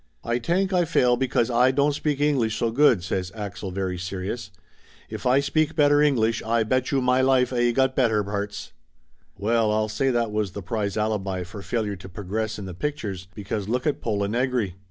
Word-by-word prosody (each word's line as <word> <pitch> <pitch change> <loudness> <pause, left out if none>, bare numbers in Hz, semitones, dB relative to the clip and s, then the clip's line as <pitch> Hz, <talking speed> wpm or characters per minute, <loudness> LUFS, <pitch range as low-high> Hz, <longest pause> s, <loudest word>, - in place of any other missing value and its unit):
"Ay 120 +1 0
tank 185 - 0
Ay 180 -1 +4
fail 125 -6 +3
because 125 -1 0
Ay 125 +2 +4
don't 140 +2 +2
speak 145 0 -1
English 135 -7 +1
so 115 - 0
good," 120 -7 +4
says 90 0 -2
Axel 100 -3 -5
very 95 -1 -3
serious. 95 +3 -4 0.6
"If - - -3
Ay 130 +3 +4
speak 155 +2 0
better 145 -1 +4
English, 115 -6 +2
Ay 115 0 +1
betchew 130 +3 0
may 125 +1 +3
life 130 -1 +3
Ay 120 -1 +2
got 130 +2 +1
better 110 -5 +2
parts!" 100 0 -5 0.6
Well, 110 +1 +1
I'll 110 0 0
say 135 +6 0
that 120 -3 0
was 105 -3 -1
the 100 - -6
prize 100 +1 -2
alibi 100 -4 -1
for 90 +3 -9
failure 105 -2 -2
to 95 +2 -11
progress 105 +4 -3
in 100 - -6
the 95 - -6
pictures, 100 - -4
because 105 -1 -4
lookit 125 +5 -1
Pola 100 -3 -1
Negri. 120 -3 0
115 Hz, 190 wpm, -24 LUFS, 100-130 Hz, 0.6 s, Ay